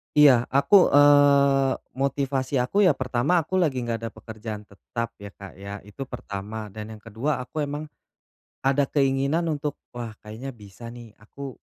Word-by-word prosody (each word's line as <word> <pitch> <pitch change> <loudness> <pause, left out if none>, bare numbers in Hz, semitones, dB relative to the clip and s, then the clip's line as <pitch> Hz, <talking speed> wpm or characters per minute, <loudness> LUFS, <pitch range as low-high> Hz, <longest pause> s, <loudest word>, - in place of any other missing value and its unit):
Iya, 135 -5 +6
aku, 175 +8 +5
eee, 140 -1 +5 0.2
motivasi 135 0 -1
aku 130 +11 0
ya 175 - +6
pertama, 130 +7 +1
aku 185 +4 -1
lagi 135 -8 +1
enggak 115 -2 -2
ada - - -3
pekerjaan 110 -1 -8
tetap 115 +3 -6
ya 100 0 -8
Kak 100 -2 -11
ya, 100 0 -7
itu 120 +7 -8
pertama. 105 -3 -6
Dan 110 +1 -7
yang 105 - -16
kedua, 125 +6 -2
aku 150 +3 -3
emang, 145 +2 -4 0.8
ada 135 +1 +2
keinginan 140 +3 +1
untuk, 150 -1 -3 0.2
wah 115 -3 -6
kayaknya 110 +6 -7
bisa 105 +2 -12
nih, 120 -2 -11
aku, 135 +5 -9
130 Hz, 160 wpm, -25 LUFS, 110-140 Hz, 0.8 s, Iya